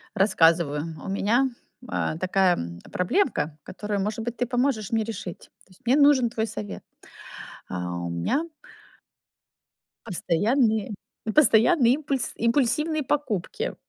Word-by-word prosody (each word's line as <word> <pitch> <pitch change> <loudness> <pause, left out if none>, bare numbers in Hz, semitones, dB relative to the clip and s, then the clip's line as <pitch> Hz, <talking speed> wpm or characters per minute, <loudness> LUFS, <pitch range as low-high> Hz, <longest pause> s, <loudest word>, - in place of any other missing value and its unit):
Рассказываю, 165 -6 +3 0.2
у - - -7
меня, 225 +7 +2 0.4
э, 155 - -1
такая 185 0 +2 0.3
проблемка, 180 - 0
которую, 210 -1 -4
может 210 +3 -2
быть, 235 0 -5
ты 245 - 0
поможешь 245 -4 0
мне 225 -1 +1
решить. 215 -5 -7 0.2
То - - -27
есть 185 - -21
мне 245 +3 +4
нужен 285 -4 +5
твой 225 0 -2
совет. 100 - -7 0.8
А, 90 -1 -4
у 85 0 -4
меня 85 - -1 1.6
постоянные 215 +5 +1 0.4
постоянные 245 -1 +5
импульс 275 -3 -2
импульсивные 290 +6 +1
покупки. 270 - -2
220 Hz, 115 wpm, -25 LUFS, 180-265 Hz, 1.6 s, нужен